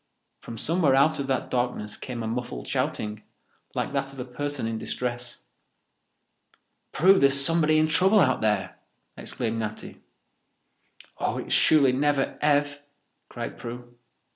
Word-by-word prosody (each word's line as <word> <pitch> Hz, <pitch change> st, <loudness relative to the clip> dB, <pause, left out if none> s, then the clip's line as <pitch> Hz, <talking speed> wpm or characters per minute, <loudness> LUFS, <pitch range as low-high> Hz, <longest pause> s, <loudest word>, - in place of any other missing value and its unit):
From 115 Hz, -, -9 dB
somewhere 160 Hz, +1 st, +2 dB
out 150 Hz, +3 st, +3 dB
of 140 Hz, -, -3 dB
that 135 Hz, -1 st, -2 dB
darkness 120 Hz, -4 st, -2 dB
came 120 Hz, -3 st, -6 dB
a -, -, -3 dB
muffled 115 Hz, -, -5 dB
shouting, 105 Hz, 0 st, -2 dB, 0.5 s
like -, -, -2 dB
that 135 Hz, -1 st, -2 dB
of 135 Hz, -, -11 dB
a 125 Hz, -, -4 dB
person 145 Hz, +1 st, -4 dB
in 115 Hz, 0 st, -3 dB
distress. 120 Hz, 0 st, -4 dB, 1.5 s
"Prue, 190 Hz, +4 st, +5 dB
there's 140 Hz, 0 st, +5 dB
somebody 155 Hz, +1 st, +4 dB
in 155 Hz, 0 st, +3 dB
trouble 190 Hz, +7 st, +4 dB
out 130 Hz, -8 st, +2 dB
there!" 100 Hz, -5 st, -1 dB, 0.4 s
exclaimed 115 Hz, -2 st, -3 dB
Natty. 110 Hz, -1 st, -6 dB, 1.2 s
"Oh, -, -, -1 dB
it's -, -, -3 dB
surely 145 Hz, -4 st, +5 dB
never 140 Hz, +1 st, 0 dB
Ev!" 145 Hz, -1 st, +1 dB, 0.5 s
cried -, -, -7 dB
Prue. 120 Hz, +1 st, -9 dB
130 Hz, 140 wpm, -25 LUFS, 120-145 Hz, 1.5 s, Prue